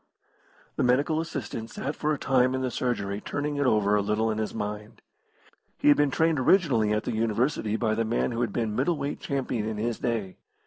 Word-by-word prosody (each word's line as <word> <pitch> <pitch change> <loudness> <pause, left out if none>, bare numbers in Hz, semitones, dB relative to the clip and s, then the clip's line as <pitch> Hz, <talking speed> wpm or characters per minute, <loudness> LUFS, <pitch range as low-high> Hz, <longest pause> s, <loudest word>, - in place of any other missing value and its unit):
The - - +1
medical 140 +6 +2
assistant 115 -7 -5
sat 145 +5 -4
for 155 - -1
a 150 - 0
time 130 -1 +2
in 130 - -2
the 130 -1 -1
surgery 105 -5 -2
turning 145 0 -3
it 145 -2 +2
over 105 -3 +3
a 105 - +3
little 105 +2 0
in 110 - -2
his 110 - -2
mind. 105 +1 -6 0.7
He - - +3
had 145 - +6
been 145 -1 +3
trained 160 +1 +2
originally 130 - +3
at 105 +1 0
the 120 - -3
University 110 0 0
by 110 -1 0
the 115 +1 0
man 115 +2 0
who 115 0 -2
had 120 -4 0
been 110 -1 -2
middle 145 +7 +1
weight 140 0 -3
champion 125 -6 -2
in 110 -1 -3
his 115 +2 -2
day. 110 -6 -2
120 Hz, 215 wpm, -27 LUFS, 110-140 Hz, 0.7 s, had